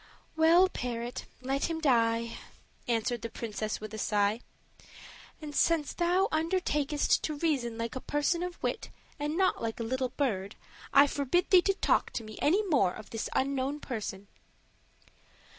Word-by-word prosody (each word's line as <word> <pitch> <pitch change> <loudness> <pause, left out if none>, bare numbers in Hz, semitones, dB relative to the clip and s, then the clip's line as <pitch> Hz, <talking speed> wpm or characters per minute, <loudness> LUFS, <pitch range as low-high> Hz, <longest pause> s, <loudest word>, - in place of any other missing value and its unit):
"Well, 330 +4 +6
parrot, 240 -6 -4 0.2
let 270 +2 0
him 330 -1 -2
die," 230 -5 +2 0.5
answered 235 0 0
the 230 - -4
princess 215 -1 -4
with 215 0 -8
a 220 - -5
sigh; 205 +2 +1 1.0
"and 300 -2 -8
since 320 -1 +2
thou 360 +3 +2
undertakest 315 -3 +1
to 305 - -2
reason 270 -8 0
like 230 +1 -4
a 260 - -4
person 295 +4 0
of 360 -1 -4
wit, - - -2 0.3
and 295 +2 -2
not 380 -1 +3 0.2
a 230 - -3
little 255 +2 -1
bird, 205 -8 -2 0.4
I 280 +1 +7
forbid 285 +5 0
thee 370 -2 +8
to 390 +2 +1
talk - - +2
to 230 - -3
me 215 0 -10
any 385 +8 +3
more 230 - +3
of 215 - -11
this 225 - -3
unknown 275 +1 0
person." 205 -7 -5
275 Hz, 155 wpm, -30 LUFS, 230-320 Hz, 1.0 s, thee